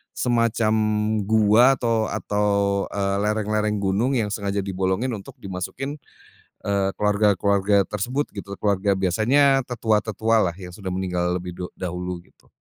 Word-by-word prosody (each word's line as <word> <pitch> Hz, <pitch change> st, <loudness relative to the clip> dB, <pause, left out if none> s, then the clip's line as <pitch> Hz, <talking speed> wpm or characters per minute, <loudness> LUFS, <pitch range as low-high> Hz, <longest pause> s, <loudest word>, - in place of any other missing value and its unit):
semacam 115 Hz, -2 st, +1 dB, 0.5 s
gua 110 Hz, +5 st, +5 dB
atau 115 Hz, -2 st, +1 dB
atau, 105 Hz, 0 st, -1 dB, 0.5 s
eee, 100 Hz, -1 st, 0 dB
lereng-lereng 105 Hz, 0 st, 0 dB
gunung 100 Hz, +7 st, +1 dB
yang 110 Hz, -5 st, 0 dB
sengaja 100 Hz, -1 st, -2 dB
dibolongin 95 Hz, +6 st, -1 dB
untuk 100 Hz, -3 st, -8 dB
dimasukin, 100 Hz, +10 st, -5 dB, 0.7 s
eee, 100 Hz, -1 st, +1 dB
keluarga-keluarga 100 Hz, -1 st, +2 dB
tersebut 120 Hz, +9 st, -3 dB
gitu. 100 Hz, -1 st, -7 dB
Keluarga 100 Hz, -1 st, +1 dB
biasanya 120 Hz, +9 st, +3 dB
tetua-tetualah 110 Hz, -4 st, +1 dB
yang 90 Hz, -2 st, -9 dB
sudah 95 Hz, +1 st, -7 dB
meninggal 90 Hz, -1 st, -1 dB
lebih 90 Hz, 0 st, -5 dB
du 90 Hz, -, -3 dB
dahulu 90 Hz, 0 st, -4 dB
gitu. -, -, -29 dB
105 Hz, 125 wpm, -23 LUFS, 95-110 Hz, 0.7 s, gua